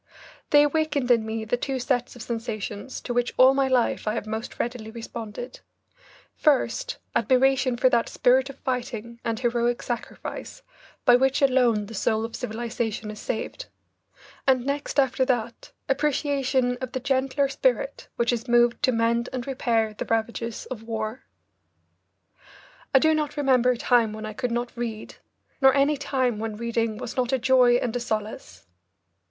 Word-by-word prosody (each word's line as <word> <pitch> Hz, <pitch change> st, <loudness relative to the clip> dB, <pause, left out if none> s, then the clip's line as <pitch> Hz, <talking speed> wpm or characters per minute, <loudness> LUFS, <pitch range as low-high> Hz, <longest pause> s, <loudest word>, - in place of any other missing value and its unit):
They 290 Hz, 0 st, +7 dB
awakened 295 Hz, -3 st, +1 dB
in 225 Hz, -2 st, +3 dB
me 220 Hz, 0 st, -3 dB
the 230 Hz, +3 st, 0 dB
two 270 Hz, +2 st, -2 dB
sets 250 Hz, -1 st, -1 dB
of 245 Hz, -, -8 dB
sensations 225 Hz, -1 st, -5 dB
to 245 Hz, -, -4 dB
which 245 Hz, 0 st, 0 dB
all 260 Hz, +1 st, +7 dB
my 270 Hz, 0 st, +2 dB
life 250 Hz, -4 st, +1 dB
I 215 Hz, -, +1 dB
have 225 Hz, -, -3 dB
most 220 Hz, +2 st, -5 dB
readily 235 Hz, -2 st, -3 dB
responded: 230 Hz, +1 st, -7 dB, 0.8 s
first, 335 Hz, -, +1 dB, 0.2 s
admiration 260 Hz, -1 st, +3 dB
for 255 Hz, -, +4 dB
that 235 Hz, -2 st, +1 dB
spirit 260 Hz, +2 st, +3 dB
of 275 Hz, -, -10 dB
fighting 235 Hz, -3 st, -4 dB
and 230 Hz, -1 st, -2 dB
heroic 240 Hz, -1 st, 0 dB
sacrifice 245 Hz, -, -6 dB, 0.4 s
by 245 Hz, -1 st, +7 dB
which 265 Hz, +2 st, +2 dB
alone 245 Hz, -6 st, +3 dB
the 220 Hz, -, -10 dB
soul 220 Hz, +1 st, 0 dB
of 230 Hz, -, -7 dB
civilisation 225 Hz, -1 st, -3 dB
is 210 Hz, -, -10 dB
saved; 250 Hz, -, -4 dB, 0.8 s
and 255 Hz, -2 st, +3 dB
next 285 Hz, +1 st, -1 dB
after 265 Hz, -1 st, +2 dB
that, 240 Hz, -3 st, -2 dB, 0.2 s
appreciation 270 Hz, -3 st, +1 dB
of 255 Hz, -1 st, -5 dB
the 260 Hz, -, -1 dB
gentler 270 Hz, +2 st, +1 dB
spirit -, -, -1 dB
which 235 Hz, +1 st, +1 dB
is 240 Hz, +1 st, -3 dB
moved 240 Hz, 0 st, +3 dB
to 275 Hz, -3 st, +3 dB
mend 235 Hz, +1 st, +1 dB
and 255 Hz, -2 st, -4 dB
repair 230 Hz, -5 st, 0 dB
the -, -, -5 dB
ravages 230 Hz, 0 st, -2 dB
of 235 Hz, -4 st, -5 dB
war. 225 Hz, +1 st, -4 dB, 1.7 s
I -, -, +6 dB
do 315 Hz, +4 st, +4 dB
not 300 Hz, -1 st, -2 dB
remember 260 Hz, -3 st, +3 dB
a 250 Hz, -, +2 dB
time 230 Hz, -3 st, +2 dB
when 215 Hz, 0 st, -6 dB
I 215 Hz, -, -6 dB
could 250 Hz, +3 st, -2 dB
not 240 Hz, +1 st, -3 dB
read, 230 Hz, -3 st, -5 dB, 0.4 s
nor 265 Hz, 0 st, +6 dB
any 280 Hz, +2 st, +3 dB
time 260 Hz, -5 st, -1 dB
when 220 Hz, -1 st, -4 dB
reading 230 Hz, -1 st, -1 dB
was 235 Hz, -, -6 dB
not 250 Hz, -1 st, 0 dB
a 265 Hz, -, +3 dB
joy 250 Hz, -1 st, +4 dB
and 245 Hz, -1 st, -1 dB
a -, -, 0 dB
solace. 215 Hz, -, -5 dB
245 Hz, 165 wpm, -25 LUFS, 230-265 Hz, 1.7 s, They